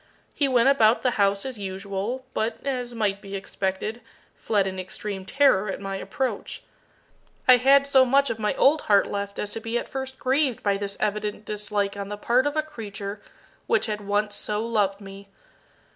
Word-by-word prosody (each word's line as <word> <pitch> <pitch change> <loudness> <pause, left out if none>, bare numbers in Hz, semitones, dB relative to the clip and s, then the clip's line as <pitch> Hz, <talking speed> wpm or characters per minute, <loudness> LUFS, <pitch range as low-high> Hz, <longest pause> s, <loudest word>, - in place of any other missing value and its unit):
He 285 - +1
went 250 -1 +3
about 235 -5 +4
the 250 - +3
house 200 +1 +2
as 260 -5 -5
usual, 200 +6 -4
but, 220 +1 -1
as 250 -3 -3
might 205 -3 0
be 200 0 -7
expected, 195 +3 -3 0.3
fled 205 -3 0
in 190 -1 -4
extreme 190 +1 -5
terror 265 -8 +3
at 190 - -3
my 195 0 -4
approach. 260 +6 -4 0.8
I 255 -1 +9
had 275 +3 +5
so 270 -2 +5
much 275 +2 +3
of 225 - -5
my 210 -1 0
old 300 +3 +4
heart 200 -1 +6
left 200 0 -4
as 205 - -3
to 225 - -4
be 225 +1 -2
at - - -4
first 265 0 -5
grieved 265 -2 +1
by 200 -1 +2
this 200 0 -4
evident 210 0 -2
dislike 210 -1 -2
on 200 0 -5
the 205 - -5
part 245 +6 +2
of 290 +1 -2
a 310 - +2
creature 205 -7 -7 0.5
which 470 - +2
had 210 -1 -3
once 205 +1 0
so 210 +1 -2
loved 205 -3 0
me. 195 0 -11
210 Hz, 190 wpm, -25 LUFS, 200-255 Hz, 0.8 s, I